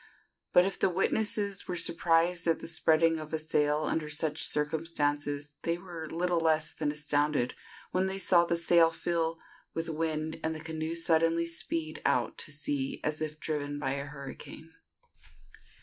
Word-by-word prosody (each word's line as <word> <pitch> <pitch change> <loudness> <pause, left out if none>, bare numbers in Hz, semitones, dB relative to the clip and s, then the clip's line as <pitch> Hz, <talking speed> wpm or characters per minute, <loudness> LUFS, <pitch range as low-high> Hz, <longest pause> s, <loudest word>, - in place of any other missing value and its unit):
But 180 - +6
if 195 - -2
the - - +3
witnesses 200 +2 0
were 180 - -2
surprised 170 0 +2
at 165 - +3
the - - -9
spreading 160 0 +3
of 155 0 -8
a - - +2
sail 150 -1 +1
under 155 0 -1
such 155 0 0
circumstances, 145 -1 -1
they 170 0 0
were 170 -3 -8
little 175 +1 0
less 160 -1 +2
than 150 -2 -1
astounded 145 -3 0 0.4
when 185 +1 +1
they 190 0 -2
saw 175 -2 +4
the 170 0 0
sail 170 -1 +5
fill 165 0 -1 0.4
with 165 0 -2
wind 160 0 -2
and 160 0 -1
the - - -5
canoe 160 0 -4
suddenly 165 0 +2
speed 165 -1 -3
out - - +1
to - - -7
sea 145 -2 -2
as 155 +1 -2
if 155 0 -4
driven 145 -1 -3
by 135 -2 -1
a 140 +1 -2
hurricane. 145 +3 -9
160 Hz, 165 wpm, -30 LUFS, 150-170 Hz, 0.4 s, But